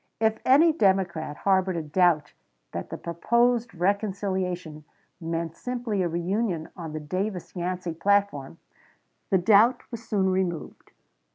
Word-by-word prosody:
If 220 0 +1
any 310 +5 +5
Democrat 185 - +1
harbored 190 -2 +1
a 165 - -2
doubt 155 -1 +2 0.4
that - - -5
the - - -5
proposed 235 +7 +1
reconciliation 185 -4 -2 0.4
meant 165 -1 -3
simply 240 -5 -3
a 180 - +1
reunion 175 0 -2
on 165 -3 -7
the 155 - -3
Davis 185 +6 -4
Yancey 180 -1 -3
platform, 170 -5 0 0.7
the 190 - +4
doubt 210 +6 +4
was 230 -1 -7
soon 195 -4 +1
removed. 185 -4 -3
185 Hz, 125 wpm, -26 LUFS, 170-210 Hz, 0.7 s, any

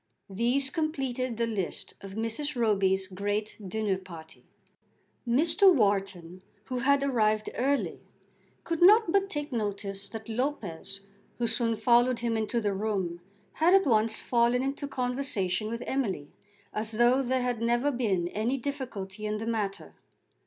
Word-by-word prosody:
These 245 +7 +1
completed 265 -6 -2
the 235 - +1
list 210 -6 -3
of 195 0 -9
Mrs. 230 +7 -2
Roby's 195 -5 +2
great 205 +3 -3
dinner 200 0 -1
party. 165 -4 -12 0.8
Mr. 325 +10 +5
Wharton, 195 - 0 0.2
who 250 +3 -4
had 280 +3 +3
arrived 215 -5 +1
early, 275 +3 0 0.6
could 335 -1 -3
not 415 +1 +7
but 395 +1 +2
take 295 -4 -4
notice 200 -3 -2
that 225 +2 -8
Lopez, 205 - -3 0.4
who 240 - 0
soon 230 0 +1
followed 240 +3 +3
him 235 -1 0
into 220 +2 0
the 205 -3 0
room, 190 -4 -2 0.3
had 345 +4 +4
at 390 -1 +4
once 220 -2 +3
fallen 240 +1 +2
into 275 +1 -3
conversation 245 -7 -1
with 235 +1 -4
Emily, 195 - -2 0.4
as 215 +1 -2
though 240 +4 +4
there 260 0 0
had 245 -2 -1
never 240 +5 +2
been 205 -9 0
any 225 +8 -1
difficulty 230 -7 -5
in 210 0 -1
the 220 - -5
matter. 205 - -3
230 Hz, 145 wpm, -28 LUFS, 200-260 Hz, 0.8 s, not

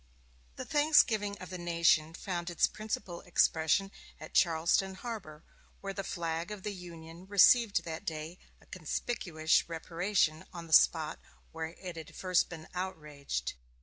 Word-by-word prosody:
The - - -6
thanksgiving 230 -9 +3
of 185 -1 -10
the 185 - -5
nation 170 -2 +2
found 175 -2 -4
its 175 - +3
principal 205 -5 -5
expression 175 +1 +2 0.3
at - - -10
Charleston 170 +3 +2
Harbor, 190 -9 -7 0.4
where 195 0 -5
the 195 0 -4
flag 165 -1 -3
of 210 -3 -7
the 210 - -3
Union 170 -1 -11
received 205 +2 +5
that 160 -1 -6
day 160 +2 -5 0.2
a - - -22
conspicuous 165 -2 -1
reparation 170 0 0
on 170 -2 -8
the 160 - -6
spot 155 0 +4 0.3
where 160 +1 -5
it 180 -3 -7
had 160 -2 -9
first 185 -2 +1
been 160 -2 -9
outraged. 150 - -4
175 Hz, 145 wpm, -31 LUFS, 160-195 Hz, 0.4 s, received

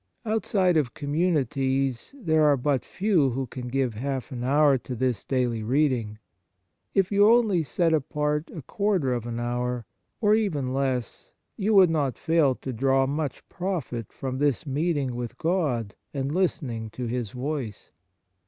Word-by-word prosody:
Outside 200 -5 +2
of 135 -6 0
communities 135 - 0
there 160 -8 +2
are 145 -2 +5
but 135 0 0
few 185 -9 +2
who 130 +2 -2
can 125 0 -7
give 130 -1 0
half 135 +5 -4
an 120 -2 -4
hour 140 +1 +4
to 125 - -6
this 125 -3 -1
daily 125 -4 0
reading. 120 -3 +1 0.8
If 195 -1 +2
you 205 +1 +5
only 220 -7 +4
set 160 +4 +1
apart 150 +1 0
a 160 - -8
quarter 190 -7 0
of 120 -1 -3
an 120 0 -4
hour, 120 0 -2 0.3
or 210 -2 +4
even 155 -13 0
less, 130 -4 -2 0.2
you 210 +2 0
\vould 185 -4 +7
not 145 -5 0
fail 160 -6 +2
to 130 - -6
draw 135 +3 +2
much 145 0 -3
profit 165 - -4
from 130 -1 -4
this 145 -2 +1
meeting 145 -2 0
with 120 0 -5
God 145 - 0 0.2
and 135 +1 -2
listening 130 -11 -1
to 125 +3 -5
His 120 -2 -2
voice. 125 -2 -5
135 Hz, 155 wpm, -26 LUFS, 125-160 Hz, 0.8 s, vould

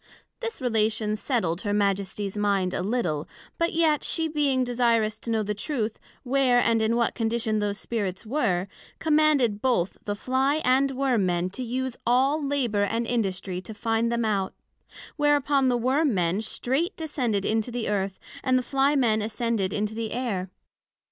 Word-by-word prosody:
This 460 -1 -4
relation 220 -3 +1
setled 200 - -1
her 205 -2 -1
Majesties 200 0 -1
mind 200 -3 +1
a - - -1
little; 180 -8 -1 0.3
but 335 0 +2
yet 320 -2 +2
she 325 -1 +1
being 285 -4 +1
desirous 230 -3 +1
to - - -7
know 220 -1 +1
the 210 0 -2
Truth, 220 -1 -3 0.2
where, 255 -1 +3
and 230 -2 +2
in 220 +1 +2
what 235 -1 +1
condition 225 -2 0
those 205 -1 -1
Spirits 205 -4 -3
were, 215 -8 0 0.3
commanded 300 -9 +3
both 235 -9 0
the 205 - -2
Fly 260 +6 +1
and 265 +2 +4
Worm 255 -7 +1
men 175 +1 0
to 255 - -6
use 255 +1 -2
all 270 +5 +2
labour 265 -7 0
and 225 +3 0
industry 190 -6 -2
to 210 +4 -9
find 225 +2 0
them 235 -1 0
out; 200 -3 -1 0.6
whereupon 290 -2 +3
the 245 -1 +2
Worm 260 +2 +2
men 180 +2 +1
straight 270 - -1
descended 250 -11 -1
into 220 +2 0
the 240 -1 -3
Earth, 195 -2 -1 0.3
and 255 0 +3
the 255 - 0
Fly 275 +3 +2
men 225 -5 +2
ascended 215 -2 -1
into 210 +1 -2
the 225 -1 -4
Air. 210 -7 -2
230 Hz, 170 wpm, -26 LUFS, 205-260 Hz, 0.6 s, and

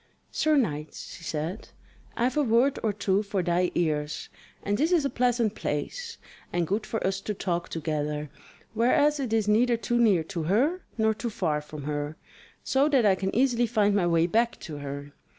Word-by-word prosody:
"Sir 310 -1 +2
knight," 150 - -1
she 165 - -9
said, 165 +6 -4 0.5
"I - - +1
have 255 +4 +1
a 300 - +3
word 250 +2 +3
or 220 - +1
two 200 -1 +1
for 200 -3 -2
thy 175 +1 +1
ears; 150 -3 -1 0.3
and 205 - 0
this 310 - +1
is 335 -5 +3
a 275 - 0
pleasant 240 -3 +1
place, 460 - -4 0.3
and 175 -1 0
good 205 +6 -2
for 225 - -2
us 195 +1 0
to 210 - -3
talk 175 -3 -2
together, 150 -2 -3 0.4
whereas 285 +6 +3
it 260 -5 -2
is 220 -2 +1
neither 235 +3 +3
too 240 +1 0
near 205 -8 +4
to 165 +1 -5
her, 255 - +1 0.2
nor 220 -1 +3
too 235 +2 -4
far 160 -8 -1
from 150 -1 -9
her, 145 +1 -3 0.5
so 275 +3 +2
that 265 -6 +3
I 200 - +6
can 190 +1 -2
easily 240 -1 +3
find 210 -3 +2
my 195 -4 +2
way 165 -1 +3
back 230 +6 +1
to 155 -4 -7
her. 140 0 -7
205 Hz, 195 wpm, -27 LUFS, 165-240 Hz, 0.5 s, I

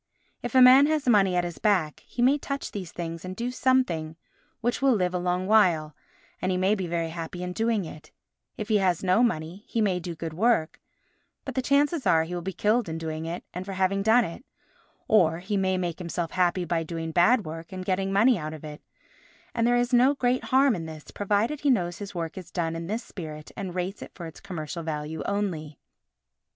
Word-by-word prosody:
If 245 +1 -5
a 255 - +8
man 260 +3 +8
has 310 -3 0
money 195 -6 +4
at 175 - +2
his 175 -1 -5
back, 185 -8 +1
he 240 - -2
may 275 +4 +4
touch 275 0 -4
these 185 -5 -6
things 165 -1 -6
and 185 0 -6
do 240 +4 -3
something 250 -13 +1 0.4
which 240 +3 -1
will 270 -3 +4
live 180 -3 0
a 180 - 0
long 180 +1 -1
while, 175 -8 +3 0.5
and 185 - 0
he 180 - 0
may 190 +3 +3
be 190 -4 -2
very 165 -1 -1
happy 165 +2 -6
in 180 0 -4
doing 225 -2 0
it; 155 -1 -11 0.5
if 215 - -4
he 215 - +4
has 185 -3 +1
no 185 +4 +3
money, 180 -4 -1
he 230 - -2
may 195 -4 +2
do 170 -1 -6
good 160 0 -5
work, 205 -3 +1 0.6
but - - -4
the 260 - 0
chances 285 +3 +2
are 160 -1 +4
he 165 +2 -6
will 175 - -3
be 190 +3 -4
killed 210 +3 +1
in 160 - -3
doing 160 0 -4
it 170 +2 -5
and 180 - -4
for 195 +1 -6
having 190 +1 +1
done 225 +3 +4
it; 170 +9 -8 0.6
or 165 -7 +4
he 190 +4 -3
may 190 -1 +1
make 175 -2 -3
himself 170 -1 -3
happy 180 0 +1
by 170 0 0
doing 165 0 -4
bad 200 +7 +4
work 165 +1 -7
and 185 -1 -6
getting 190 +1 0
money 215 +2 +4
out 155 0 -5
of 155 - -12
it, 150 -1 -8 0.7
and 230 0 +1
there 245 - +4
is 245 +1 0
no 255 +4 +5
great 255 -1 0
harm 265 -1 +4
in 165 -3 -5
this, 155 -1 -10
provided 210 +8 0
he 290 - +1
knows 175 -9 +1
his 200 -2 -7
work 165 +1 -4
is 175 -2 -11
done 165 -2 -2
in 165 0 -5
this 220 +5 -3
spirit 155 -5 -8
and 185 -3 -5
rates 185 +3 -3
it - - -8
for 175 - -7
its 160 - -9
commercial 170 -3 -6
value 155 0 -4
only. 175 -8 -2
185 Hz, 225 wpm, -26 LUFS, 165-220 Hz, 0.7 s, a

